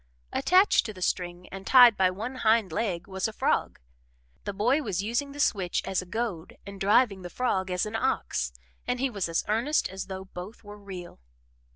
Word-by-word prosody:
Attached 375 +3 +4
to 215 - -6
the 185 - -11
string 180 0 -2
and 195 0 -9
tied 245 -4 +8
by 190 -1 +3
one 220 +8 -5
hind 220 -5 +2
leg 175 -1 -2
was 190 +1 -2
a - - -5
frog. - - 0 0.7
The - - -2
boy 240 +9 +2
was 195 -7 -2
using 240 +6 -1
the 290 - -10
switch 190 -10 +1
as 190 -1 0
a 185 - -11
goad 190 -5 -4
and 200 -1 -10
driving 205 0 +3
the 175 - -7
frog 190 -5 -1
as 180 +1 0
an 215 +1 -5
ox, 65 - -1 0.4
and 250 - -1
he 270 0 0
was 200 -6 -2
as 165 - 0
earnest 235 +9 +1
as 190 0 -6
though 190 -1 -6
both 190 +4 -9
were 205 0 -11
real. 185 - -9
200 Hz, 200 wpm, -27 LUFS, 185-230 Hz, 0.7 s, tied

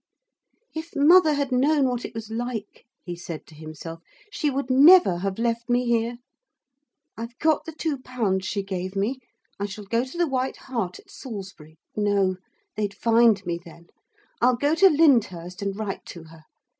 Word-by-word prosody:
'If 320 +1 -7
mother 310 +2 +6
had 280 -2 -1
known 275 +2 +3
what 245 -1 -2
it - - -9
was 225 -1 -7
like,' 230 -2 -5 0.2
he 175 -2 -5
said 170 -2 -8
to - - -17
himself, 155 +1 -9 0.3
'she 305 -7 0
would 275 -1 -2
never 280 - +7
have 195 +1 -3
left 235 +1 -1
me 245 +1 +2
here. 235 0 0 1.0
I've 230 +2 -8
got 315 -2 +1
the 325 - -6
two 310 -3 -3
pounds 210 -8 -2
she 200 -2 -2
gave 190 0 -5
me. 220 +7 -1 0.4
I 200 - -1
shall 205 +1 -8
go 230 +4 0
to 260 +6 -9
the 345 - +3
White 260 -1 -2
Hart 225 -9 -4
at - - -18
Salisbury... 190 - -9 0.2
no, 200 -3 +1 0.4
they'd 205 -1 -2
find 230 -3 +3
me 170 -1 -2
then. 170 0 -15 0.5
I'll 250 +1 +4
go 285 +4 +1
to 385 +4 +6
Lyndhurst; 205 - +2
and 200 0 -3
write 210 -3 -4
to 170 - -9
her. 160 -1 -16
230 Hz, 175 wpm, -24 LUFS, 190-265 Hz, 1.0 s, never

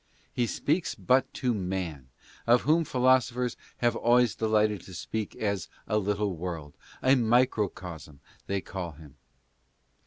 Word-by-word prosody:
He 120 -1 +1
speaks 155 +9 0
but 130 +1 +2
to 125 -2 0
man, 90 - -3 0.4
of 120 +1 +6
whom 160 +3 +3
philosophers 125 -2 +2 0.2
have 120 -1 +1
always 120 -1 +3
delighted 110 -3 +1
to 95 - -11
speak 110 +4 -4
as 100 -3 -2 0.2
a 105 -1 +2
little 105 -1 -1
world 80 -4 -5 0.2
— - - -22
a 130 - +5
"Microcosm," 105 - 0 0.3
they 100 0 -1
call 90 -4 -6
him. 75 -1 -15
105 Hz, 135 wpm, -28 LUFS, 90-125 Hz, 0.4 s, of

